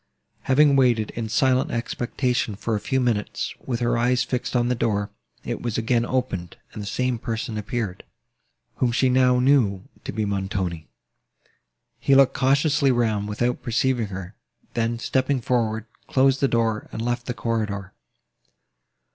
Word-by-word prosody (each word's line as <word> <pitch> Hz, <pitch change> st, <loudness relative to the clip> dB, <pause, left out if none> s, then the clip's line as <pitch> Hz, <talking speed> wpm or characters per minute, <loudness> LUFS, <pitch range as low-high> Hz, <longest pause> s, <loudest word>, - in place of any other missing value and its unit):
Having 140 Hz, +1 st, +5 dB
waited 120 Hz, -5 st, +3 dB
in 115 Hz, -1 st, -4 dB
silent 130 Hz, +3 st, +2 dB
expectation 120 Hz, -1 st, -1 dB
for 115 Hz, +3 st, -3 dB
a 105 Hz, -, +1 dB
few 130 Hz, +5 st, 0 dB
minutes, 115 Hz, -5 st, -1 dB
with 120 Hz, -2 st, -3 dB
her 120 Hz, 0 st, +1 dB
eyes 125 Hz, +1 st, +2 dB
fixed 125 Hz, +1 st, -3 dB
on 120 Hz, 0 st, +2 dB
the 125 Hz, -, +2 dB
door, 105 Hz, -4 st, -1 dB, 0.3 s
it -, -, -4 dB
was 120 Hz, -3 st, -2 dB
again 115 Hz, +1 st, +1 dB
opened, 110 Hz, -10 st, -2 dB, 0.2 s
and 105 Hz, -, -6 dB
the 100 Hz, -, -6 dB
same 125 Hz, +2 st, -1 dB
person 115 Hz, -1 st, -3 dB
appeared, 105 Hz, -2 st, -3 dB, 0.7 s
whom 125 Hz, -2 st, +2 dB
she 130 Hz, +2 st, +2 dB
now 125 Hz, 0 st, +4 dB
knew 125 Hz, -8 st, +3 dB, 0.2 s
to -, -, -4 dB
be 110 Hz, -1 st, -1 dB
Montoni. 95 Hz, -5 st, -2 dB, 1.1 s
He 140 Hz, -, +3 dB
looked 135 Hz, -1 st, +6 dB
cautiously 140 Hz, +1 st, +3 dB
round, 110 Hz, -4 st, +1 dB
without 120 Hz, +4 st, -1 dB
perceiving 120 Hz, -1 st, 0 dB
her, 95 Hz, 0 st, -7 dB, 0.4 s
then, 115 Hz, 0 st, 0 dB
stepping 130 Hz, +3 st, 0 dB
forward, 110 Hz, -3 st, 0 dB, 0.2 s
closed 135 Hz, 0 st, +3 dB
the 140 Hz, -, +3 dB
door, 115 Hz, -3 st, 0 dB
and -, -, -6 dB
left 120 Hz, +1 st, -2 dB
the 125 Hz, -, -2 dB
corridor. 105 Hz, -5 st, -2 dB
120 Hz, 155 wpm, -24 LUFS, 110-130 Hz, 1.1 s, looked